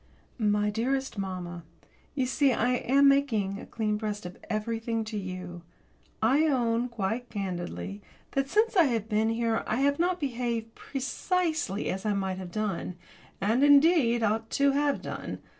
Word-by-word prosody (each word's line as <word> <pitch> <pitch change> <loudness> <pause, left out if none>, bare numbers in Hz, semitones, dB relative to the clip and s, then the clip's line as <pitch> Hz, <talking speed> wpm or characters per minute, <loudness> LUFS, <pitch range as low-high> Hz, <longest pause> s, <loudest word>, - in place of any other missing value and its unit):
My 210 -1 +2
dearest 265 +2 -1
mamma, 180 -3 -5 0.5
you 265 -3 +1
see 270 +2 +2
I 245 0 +1
am 275 +3 +4
making 225 -9 +2
a - - -10
clean 215 -2 -1
breast 210 -2 -4
of 180 - -7
everything 225 +1 -1
to 215 0 -6
you. 185 -3 -5 0.6
I 280 +8 +4
own, 240 -3 +1
quite 235 +2 -3
candidly, 175 - -4 0.3
that 275 0 0
since 435 +5 +2
I 345 -4 +6
have 230 -5 -1
been 220 0 +1
here 225 0 0
I - - 0
have 285 +1 +2
not 355 +1 +1
behaved 235 -4 -2
precisely 300 - -2
as 190 +1 -4
I 210 - +1
might 190 -1 -2
have 180 -2 -7
done, 200 -3 -2 0.4
and, 225 +7 +2
indeed, 285 -5 +5
ought 220 +1 0
to 280 0 +4
have 285 +1 +1
done. - - -5
225 Hz, 160 wpm, -28 LUFS, 205-275 Hz, 0.6 s, I